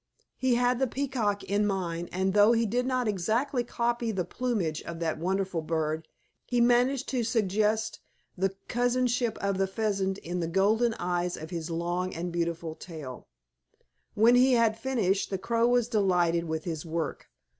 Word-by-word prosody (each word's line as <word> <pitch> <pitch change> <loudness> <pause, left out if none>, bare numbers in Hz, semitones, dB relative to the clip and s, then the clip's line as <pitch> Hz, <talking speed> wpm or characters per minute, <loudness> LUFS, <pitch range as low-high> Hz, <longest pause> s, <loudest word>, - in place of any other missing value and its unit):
He 260 -2 +2
had 245 0 +2
the 265 - +2
Peacock 240 -6 -1
in 205 +1 +1
mind, 175 -3 -2
and 190 +1 0
though 210 +3 +6
he 230 0 +2
did 245 +4 0
not 255 -2 0
exactly 225 +7 0
copy 235 -1 -1
the 190 -4 -2
plumage 195 -8 -2
of 170 - -7
that 160 -2 -1
wonderful 185 0 -1
bird, 155 0 -2 0.4
he 245 - +1
managed 245 +3 +3
to 250 -3 0
suggest 215 -1 0 0.4
the 195 +1 -1
cousinship 245 -1 +1
of 200 -1 0
the 195 - +2
Pheasant 195 -2 -1
in 180 -1 -4
the 165 - -1
golden 215 +6 +2
eyes 175 0 -1
of 160 +2 -8
his 165 -1 -4
long 175 +2 -2
and 175 +2 -3
beautiful 170 -1 -2
tail. 155 -7 -9 0.9
When 225 +3 +6
he 255 +1 +5
had 230 -2 +3
finished, 225 -6 0
the 195 - -1
Crow 230 +4 +1
was 245 -1 +3
delighted 180 -6 +2
with 160 -1 -3
his 160 -3 -4
work. 165 -2 -4
200 Hz, 165 wpm, -28 LUFS, 175-240 Hz, 0.9 s, though